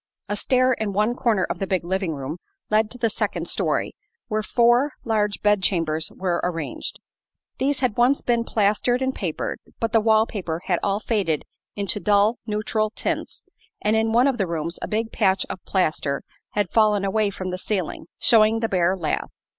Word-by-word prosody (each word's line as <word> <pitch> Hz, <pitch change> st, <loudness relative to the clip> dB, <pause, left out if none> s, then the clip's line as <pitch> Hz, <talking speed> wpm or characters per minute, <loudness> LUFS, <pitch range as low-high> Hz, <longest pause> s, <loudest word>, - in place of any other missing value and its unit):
A 205 Hz, -, -1 dB
stair 255 Hz, +4 st, +2 dB
in 215 Hz, -4 st, -2 dB
one 210 Hz, +4 st, +2 dB
corner 230 Hz, -6 st, +1 dB
of -, -, -4 dB
the 195 Hz, -, -2 dB
big 185 Hz, -2 st, 0 dB
living 185 Hz, -2 st, -1 dB
room 140 Hz, +5 st, -5 dB, 0.3 s
led 215 Hz, 0 st, +3 dB
to 250 Hz, -, -6 dB
the 235 Hz, -2 st, +1 dB
second 215 Hz, -, -2 dB
story, -, -, -1 dB, 0.4 s
where 215 Hz, -1 st, 0 dB
four 240 Hz, +5 st, +3 dB
large 210 Hz, -3 st, 0 dB
bed 205 Hz, -1 st, +4 dB
chambers 165 Hz, -4 st, 0 dB
were 180 Hz, -2 st, -1 dB
arranged. 165 Hz, -4 st, -3 dB, 0.6 s
These 275 Hz, +1 st, 0 dB
had 250 Hz, -5 st, 0 dB
once 250 Hz, +4 st, +4 dB
been 235 Hz, -1 st, +1 dB
plastered 225 Hz, +4 st, +1 dB
and 260 Hz, 0 st, 0 dB
papered, 175 Hz, -10 st, -3 dB, 0.2 s
but 225 Hz, -1 st, -1 dB
the 225 Hz, -, +5 dB
wall 220 Hz, 0 st, +4 dB
paper 175 Hz, -7 st, -4 dB
had 180 Hz, -3 st, +1 dB
all 200 Hz, 0 st, 0 dB
faded 195 Hz, -10 st, 0 dB, 0.3 s
into 200 Hz, 0 st, 0 dB
dull, 210 Hz, +3 st, +3 dB
neutral 215 Hz, 0 st, 0 dB
tints -, -, -3 dB, 0.3 s
and 215 Hz, +1 st, +1 dB
in 220 Hz, 0 st, +2 dB
one 240 Hz, +3 st, +4 dB
of 270 Hz, -4 st, +1 dB
the 195 Hz, -, +1 dB
rooms 170 Hz, 0 st, -3 dB
a -, -, -3 dB
big 225 Hz, +1 st, -1 dB
patch 195 Hz, -3 st, +2 dB
of 185 Hz, -, -8 dB
plaster 155 Hz, -6 st, 0 dB, 0.3 s
had 205 Hz, 0 st, 0 dB
fallen 210 Hz, -3 st, +3 dB
away 210 Hz, +1 st, +1 dB
from 185 Hz, -2 st, -5 dB
the 185 Hz, -, -4 dB
ceiling, 190 Hz, -4 st, -3 dB
showing 225 Hz, -1 st, +4 dB
the 225 Hz, -, 0 dB
bare 185 Hz, 0 st, +2 dB
lath. 160 Hz, -4 st, -2 dB
210 Hz, 185 wpm, -23 LUFS, 185-225 Hz, 0.6 s, the